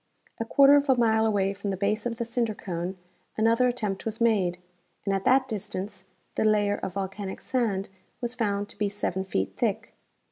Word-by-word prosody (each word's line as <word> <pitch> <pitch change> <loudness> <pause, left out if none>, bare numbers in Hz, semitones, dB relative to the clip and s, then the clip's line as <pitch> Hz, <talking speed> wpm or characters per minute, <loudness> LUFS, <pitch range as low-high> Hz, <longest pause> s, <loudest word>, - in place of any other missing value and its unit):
A 225 - -1
quarter 280 +4 +7
of 285 0 0
a 265 - +6
mile 220 -2 +3
away 200 -2 +1
from 200 +1 -5
the 190 - -2
base 210 +4 0
of 235 - -3
the 235 - -2
cinder 230 -2 -1
cone 180 0 -4 0.4
another 230 +3 +4
attempt 215 -6 -2
Avas 225 0 -4
made, 200 -7 +2 0.5
and 200 - +1
at 195 0 -1
that 260 +1 +4
distance 205 -3 -5 0.3
the - - 0
layer 205 -1 +3
of 185 - -5
volcanic 195 0 -4
sand 215 -7 -1 0.4
Avas 240 +1 -2
found 205 -4 0
to - - -13
be 205 -1 +1
seven 190 -2 -2
feet 100 - -2
thick. - - -1
210 Hz, 190 wpm, -27 LUFS, 195-230 Hz, 0.5 s, quarter